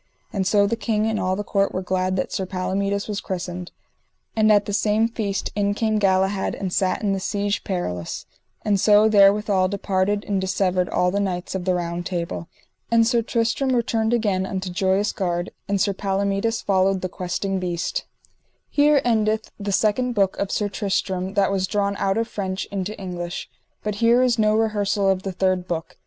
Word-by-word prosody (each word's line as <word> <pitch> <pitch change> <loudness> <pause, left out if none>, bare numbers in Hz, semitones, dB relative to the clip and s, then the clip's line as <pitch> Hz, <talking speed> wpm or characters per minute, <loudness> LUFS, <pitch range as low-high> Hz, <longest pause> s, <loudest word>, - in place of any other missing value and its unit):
And 190 -2 0
so 205 0 +4
the 220 +3 0
king 220 -2 0
and 220 -1 0
all 185 0 0
the 205 - -3
court 200 -1 0
were 185 - -2
glad 185 0 0
that 185 - -2
Sir 190 - -2
Palomides 200 +2 -1
was 205 -2 -3
christened. 180 -1 -5 0.6
And 215 -1 +4
at 205 -1 +4
the 205 - -4
same 215 +2 +2
feast 210 -4 -3
in 205 0 +1
came 215 -1 +1
Galahad 190 0 +1
and 190 -2 -4
sat 190 +3 0
in 200 -2 +1
the 195 - -1
Siege 205 +1 -1
Perilous. 90 - -3 0.4
And 205 -2 +2
so 210 +2 +5
therewithal 200 -2 +4
departed 200 +1 0
and 195 -2 0
dissevered 185 -1 0
all 180 0 +1
the 200 - 0
knights 185 -3 -2
of 190 -2 -3
the 185 -1 +2
Round 170 0 -3
Table. 170 -2 -4 0.4
And 230 -1 +4
Sir 235 0 +2
Tristram 230 +3 0
returned 225 -2 +1
again 205 -6 +1
unto 190 -1 -4
Joyous 190 +2 +1
Gard, 175 -2 -2 0.2
and 200 -1 0
Sir 200 +2 +2
Palomides 200 +3 -1
followed 190 -1 +2
the 185 - -1
Questing 190 +2 -1
Beast. 175 -2 -2 0.7
_Here 290 -1 +5
endeth 220 -2 +1
the 200 0 -3
second 225 +5 +1
book 195 -3 +2
of 200 - -1
Sir 210 - 0
Tristram 190 -1 -2
that 200 -1 +3
was 190 -1 0
drawn 200 0 0
out 195 +1 0
of 225 0 0
French 190 -3 -3
into 200 +1 -4
English. 175 -2 -5 0.3
But 210 - -1
here 235 +2 +5
is 240 -2 +2
no 215 0 +3
rehersal 205 -2 +1
of 190 -1 -1
the 195 - -4
third 185 0 0
book. 165 -2 -4
200 Hz, 190 wpm, -23 LUFS, 185-215 Hz, 0.7 s, so